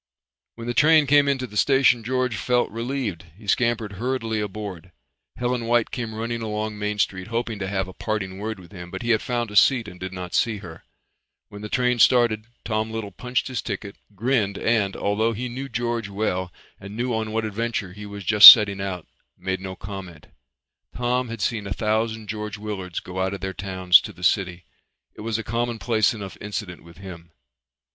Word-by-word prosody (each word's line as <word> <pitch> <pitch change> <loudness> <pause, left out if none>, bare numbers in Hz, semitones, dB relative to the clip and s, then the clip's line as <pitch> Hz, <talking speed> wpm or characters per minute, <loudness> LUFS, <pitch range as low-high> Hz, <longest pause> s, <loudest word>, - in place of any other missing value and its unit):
When 115 - -8
the 120 - -2
train 155 +4 +5
came 145 +1 +4
into 135 -2 0
the 105 - -12
station 130 0 +4
George 125 0 -1
felt 125 +4 0
relieved. 115 -6 -4
He 105 - -15
scampered 115 0 0
hurriedly 115 -3 -2
aboard. 100 -4 -6 0.4
Helen 125 -1 -2
White 120 -1 +2
came 115 -3 -4
running 115 +1 -3
along 105 -1 -3
Main 105 0 -2
Street 95 -2 -1
hoping 115 -1 -3
to 95 - -3
have 95 -1 -2
a 95 - -10
parting 95 -3 -4
word 110 0 -4
with 90 0 -15
him, 90 -3 -9
but 95 +4 -6
he 120 - +1
had 110 - +3
found 120 -3 -2
a - - -8
seat 120 +1 +4
and 90 +1 -11
did 95 0 -5
not 90 -1 -7
see 115 -3 +1
her. 85 -4 -11 0.7
When 100 - -10
the 105 - -6
train 125 0 +1
started 115 -3 +4 0.2
Tom 110 0 -1
Little 110 -2 -5
punched 125 +7 -2
his 130 -2 -3
ticket, 100 -1 -6 0.2
grinned 110 -2 0
and, 105 -4 +1
although 110 +3 0
he 125 +4 -4
knew 130 +3 -6
George 120 -2 -2
well 95 -3 -2 0.3
and 100 +2 -9
knew 125 +1 -1
on 110 -1 -2
what 110 0 -1
adventure 110 -3 -3
he 105 +1 -9
was 100 0 -8
just 105 +1 +13
setting 100 -3 +2
out, 95 -3 -4 0.3
made 95 0 -3
no 95 -1 -6
comment. 95 -5 -9 0.7
Tom 125 0 -1
had 115 -2 -6
seen 105 0 -1
a 100 - -2
thousand 110 +1 -1
George 105 0 -5
Willards 100 -4 -5
go 95 +1 -5
out 95 +1 -1
of 95 - -10
their 95 0 -3
towns 95 -2 +4
to - - -8
the 90 - -14
city. 90 -1 0 0.5
It - - -11
was 110 0 -2
a 115 - -4
commonplace 115 -1 0
enough 100 -5 -8
incident 105 -3 -6
with 85 0 -16
him. 85 -3 -10
110 Hz, 200 wpm, -23 LUFS, 95-120 Hz, 0.7 s, just